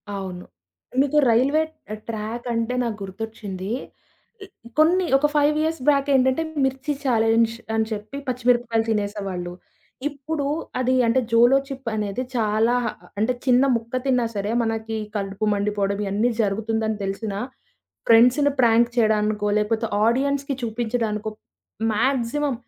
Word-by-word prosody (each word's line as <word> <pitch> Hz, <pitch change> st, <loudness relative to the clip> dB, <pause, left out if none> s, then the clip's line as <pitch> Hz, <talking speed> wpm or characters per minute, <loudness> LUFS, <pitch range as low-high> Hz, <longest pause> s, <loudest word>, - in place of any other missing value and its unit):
అవును. 185 Hz, -2 st, -6 dB, 0.6 s
మీకు 285 Hz, +2 st, +1 dB
రైల్వే 270 Hz, +7 st, +3 dB, 0.3 s
ఆహ్, 215 Hz, -, -6 dB
ట్రాకంటే 230 Hz, +2 st, -3 dB
నాకు 230 Hz, -3 st, -3 dB
గుర్తొచ్చింది. 195 Hz, -1 st, -6 dB, 1.1 s
కొన్ని 355 Hz, +4 st, +4 dB
ఒక 295 Hz, +2 st, +2 dB
5 295 Hz, 0 st, +3 dB
ఇయర్స్ 320 Hz, -2 st, -1 dB
బ్యాక్ 280 Hz, -1 st, +2 dB
ఏంటంటే 260 Hz, +4 st, +3 dB, 0.2 s
మిర్చి 265 Hz, +2 st, -2 dB
ఛాలెంజ్ 225 Hz, -2 st, +3 dB, 0.2 s
అని 220 Hz, 0 st, +2 dB
చెప్పి 215 Hz, +5 st, -5 dB
పచ్చిమిరపకాయలు 240 Hz, -2 st, +1 dB
తినేసేవాళ్ళు. 200 Hz, -4 st, -2 dB, 0.6 s
ఇప్పుడు 290 Hz, +1 st, -4 dB, 0.3 s
అది 255 Hz, 0 st, +1 dB
అంటే 230 Hz, +3 st, +3 dB
'జోలోచిప్' 265 Hz, +2 st, +3 dB
అనేది 210 Hz, +3 st, -2 dB
చాలా 220 Hz, +1 st, +2 dB, 0.4 s
అంటే 225 Hz, +4 st, +2 dB
చిన్న 255 Hz, 0 st, +5 dB
ముక్క 230 Hz, +2 st, -4 dB
తిన్నా 250 Hz, -3 st, +2 dB
సరే 205 Hz, +1 st, -2 dB
మనకి 225 Hz, 0 st, -2 dB, 0.2 s
కలుపు 195 Hz, +1 st, -2 dB
మండిపోవడం 200 Hz, -1 st, -1 dB
ఇయన్నీ 205 Hz, +5 st, +1 dB
జరుగుతుందని 220 Hz, +1 st, -1 dB
తెలిసినా, 195 Hz, +1 st, -3 dB, 0.7 s
ఫ్రెండ్స్‌ని 250 Hz, +5 st, +5 dB
ప్రాంక్ 235 Hz, 0 st, +4 dB
చేయడానికో 210 Hz, -2 st, +2 dB
లేకపోతే 220 Hz, +2 st, 0 dB, 0.2 s
ఆడియన్స్‌కి 275 Hz, +3 st, 0 dB
చూపించడానికో 220 Hz, -2 st, -2 dB, 0.6 s
మాక్సిమం 265 Hz, +4 st, 0 dB
230 Hz, 115 wpm, -23 LUFS, 210-260 Hz, 1.1 s, చిన్న